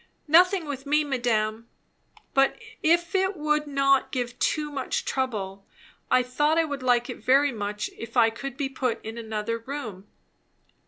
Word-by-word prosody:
"Nothing, 360 Hz, +3 st, +5 dB
with 280 Hz, -1 st, -6 dB
me, 300 Hz, +1 st, +3 dB
madame. 230 Hz, -5 st, -1 dB, 0.6 s
But 270 Hz, 0 st, +3 dB, 0.2 s
if 340 Hz, +2 st, +2 dB
it 380 Hz, 0 st, +1 dB
would 300 Hz, 0 st, 0 dB
not 275 Hz, -1 st, +2 dB
give 245 Hz, -1 st, -3 dB
too 300 Hz, -1 st, 0 dB
much 275 Hz, -2 st, -2 dB
trouble 200 Hz, -7 st, -3 dB, 0.4 s
I 255 Hz, -, +4 dB
thought 295 Hz, +5 st, +1 dB
I 330 Hz, -, +4 dB
would 285 Hz, -3 st, -5 dB
like 245 Hz, -1 st, +2 dB
it -, -, -6 dB
very 275 Hz, +2 st, +4 dB
much 210 Hz, -2 st, -3 dB
if 230 Hz, +2 st, -7 dB
I 225 Hz, -1 st, +5 dB
could 270 Hz, +3 st, -7 dB
be 285 Hz, -2 st, -1 dB
put 260 Hz, -3 st, -2 dB
in 220 Hz, +1 st, -5 dB
another 220 Hz, 0 st, -3 dB
room." 225 Hz, -6 st, -7 dB
265 Hz, 160 wpm, -26 LUFS, 230-295 Hz, 0.6 s, Nothing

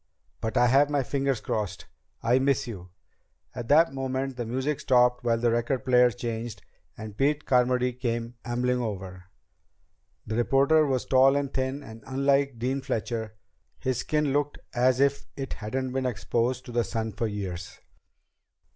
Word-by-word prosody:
But 110 Hz, -1 st, -2 dB
I 125 Hz, -, +5 dB
have 135 Hz, +4 st, +4 dB
my 145 Hz, -2 st, +1 dB
fingers 135 Hz, -2 st, -1 dB
crossed. 100 Hz, -5 st, -3 dB, 0.4 s
I 120 Hz, +3 st, +4 dB
miss 135 Hz, -1 st, +1 dB
you." 95 Hz, -6 st, -8 dB, 0.6 s
At 120 Hz, -2 st, -6 dB
that 150 Hz, +1 st, +5 dB
moment 135 Hz, 0 st, -2 dB
the 120 Hz, -2 st, -4 dB
music 130 Hz, +5 st, -1 dB
stopped 125 Hz, -1 st, +3 dB
while 115 Hz, -1 st, +2 dB
the 120 Hz, 0 st, +1 dB
record 120 Hz, +3 st, -1 dB
player 125 Hz, -1 st, +5 dB
changed, 115 Hz, 0 st, -5 dB, 0.3 s
and 110 Hz, -2 st, -8 dB
Pete 145 Hz, +5 st, +1 dB
Carmody 125 Hz, 0 st, +2 dB
came 120 Hz, -1 st, -3 dB
ambling 125 Hz, +1 st, 0 dB
over. 95 Hz, -5 st, -5 dB, 1.0 s
The 110 Hz, +1 st, -3 dB
reporter 140 Hz, +5 st, +4 dB
was 130 Hz, -2 st, 0 dB
tall 135 Hz, +1 st, +5 dB
and 140 Hz, -1 st, -1 dB
thin, 130 Hz, +2 st, -2 dB
and 110 Hz, -2 st, -11 dB
unlike 140 Hz, 0 st, +1 dB
Dean 130 Hz, +4 st, -1 dB
Fletcher, 115 Hz, -4 st, -3 dB, 0.4 s
his 130 Hz, -1 st, -1 dB
skin 150 Hz, 0 st, 0 dB
looked 145 Hz, 0 st, 0 dB, 0.2 s
as 125 Hz, +1 st, +3 dB
if 140 Hz, 0 st, +1 dB
it 135 Hz, -1 st, -4 dB
hadn't 130 Hz, +5 st, -3 dB
been 130 Hz, 0 st, -1 dB
exposed 125 Hz, +1 st, -1 dB
to 125 Hz, -, -8 dB
the 120 Hz, 0 st, +1 dB
sun 110 Hz, -1 st, -3 dB
for 115 Hz, +3 st, -1 dB
years. 95 Hz, -5 st, -6 dB
125 Hz, 160 wpm, -27 LUFS, 115-135 Hz, 1.0 s, I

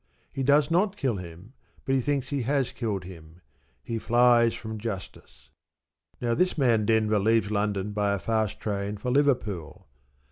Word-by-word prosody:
He 135 Hz, -, -3 dB
does 145 Hz, +3 st, +3 dB
not 195 Hz, +4 st, +2 dB
kill 130 Hz, -, -1 dB
him, 90 Hz, +6 st, -10 dB, 0.3 s
but 135 Hz, -, 0 dB
he 135 Hz, -, +2 dB
thinks 140 Hz, 0 st, -1 dB
he 140 Hz, -2 st, -1 dB
has 130 Hz, 0 st, 0 dB
killed 110 Hz, -7 st, -3 dB
him. 85 Hz, -1 st, -13 dB, 0.4 s
He 115 Hz, -1 st, -3 dB
flies 120 Hz, 0 st, +4 dB
from 110 Hz, -1 st, -7 dB
justice. 95 Hz, -, -8 dB, 0.7 s
Now 120 Hz, -1 st, 0 dB
this 180 Hz, +8 st, +1 dB
man 115 Hz, -7 st, +2 dB
Denver 110 Hz, -1 st, +2 dB
leaves 110 Hz, +1 st, +2 dB
London 105 Hz, -1 st, -1 dB
by 105 Hz, -1 st, 0 dB
a -, -, 0 dB
fast 110 Hz, +2 st, -1 dB
train 100 Hz, 0 st, -3 dB
for 125 Hz, +5 st, -3 dB
Liverpool. 120 Hz, -, 0 dB
110 Hz, 165 wpm, -26 LUFS, 100-130 Hz, 0.7 s, flies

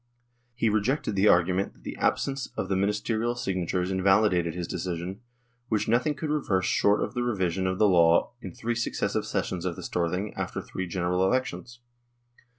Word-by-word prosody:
He 120 Hz, -1 st, +1 dB
rejected 110 Hz, +2 st, 0 dB
the 100 Hz, +1 st, +3 dB
argu 90 Hz, -2 st, +5 dB
ment 95 Hz, +1 st, -1 dB
that -, -, -24 dB
the -, -, -6 dB
absence 135 Hz, -1 st, 0 dB
of 95 Hz, -, -2 dB
the 95 Hz, -, +1 dB
Ministerial 105 Hz, +4 st, 0 dB
signatures 90 Hz, -4 st, -1 dB
invalidated 95 Hz, -3 st, +3 dB
his 90 Hz, -2 st, -4 dB
decision, 90 Hz, +3 st, -4 dB, 0.5 s
which 110 Hz, -3 st, 0 dB
nothing 125 Hz, +7 st, +2 dB
could 155 Hz, 0 st, -3 dB
reverse 95 Hz, -11 st, 0 dB
short 100 Hz, +1 st, +3 dB
of -, -, -4 dB
the 120 Hz, -, -1 dB
revision 95 Hz, -6 st, 0 dB
of 95 Hz, 0 st, -1 dB
the 105 Hz, -, +5 dB
law 85 Hz, -3 st, +4 dB
in 95 Hz, -, -7 dB
three 115 Hz, +6 st, -3 dB
successive 120 Hz, +1 st, -1 dB
sessions 90 Hz, -2 st, -2 dB
of 90 Hz, -2 st, -2 dB
the -, -, -8 dB
Storthing 90 Hz, +4 st, -2 dB
after -, -, -4 dB
three 95 Hz, 0 st, -5 dB
General 90 Hz, +1 st, -1 dB
Elec 130 Hz, +3 st, +2 dB
tions. 120 Hz, 0 st, -9 dB
95 Hz, 180 wpm, -27 LUFS, 90-115 Hz, 0.5 s, argu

